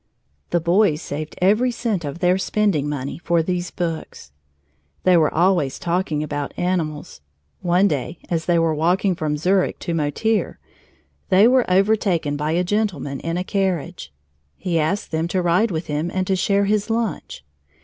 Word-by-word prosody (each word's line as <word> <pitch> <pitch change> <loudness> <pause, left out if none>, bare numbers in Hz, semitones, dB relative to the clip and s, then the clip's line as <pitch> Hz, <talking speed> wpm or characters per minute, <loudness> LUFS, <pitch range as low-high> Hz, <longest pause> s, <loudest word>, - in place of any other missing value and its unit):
The 175 - +1
boys 170 -1 +2
saved 155 -1 -6
every 215 +7 +4
cent 225 -7 -2
of 145 +1 -5
their 180 +1 +2
spending 190 -8 0
money 140 +1 -4
for 170 -1 +1
these 180 0 -2
books. 165 - -5 0.7
They 185 -1 +5
were 160 -3 +3
always 170 -5 +2
talking 170 -3 -1
about 145 -2 -4
animals. 165 - -2 0.4
One 180 +3 +3
day, 150 0 -3
as 165 -2 -2
they 175 -1 +3
were 165 -1 +2
walking 180 +5 +1
from 155 -3 -2
Zurich 185 +4 +1
to 170 - -4
Motier, 165 +8 0 0.7
they 195 +3 +6
were 255 -3 +3
overtaken 185 -6 +2
by 150 +2 -1
a 175 +2 +1
gentleman 180 -9 -2
in 165 +1 -3
a 180 - -1
carriage. 185 - -2 0.5
He 175 -3 -1
asked 175 +7 -1
them 160 +1 -1
to 185 +1 0
ride 180 +6 +3
with 165 -2 -3
him 150 +3 -2
and 185 0 -1
to 190 - +1
share 200 +2 +2
his 210 +1 0
lunch. 225 -6 -3
175 Hz, 165 wpm, -21 LUFS, 155-195 Hz, 0.7 s, they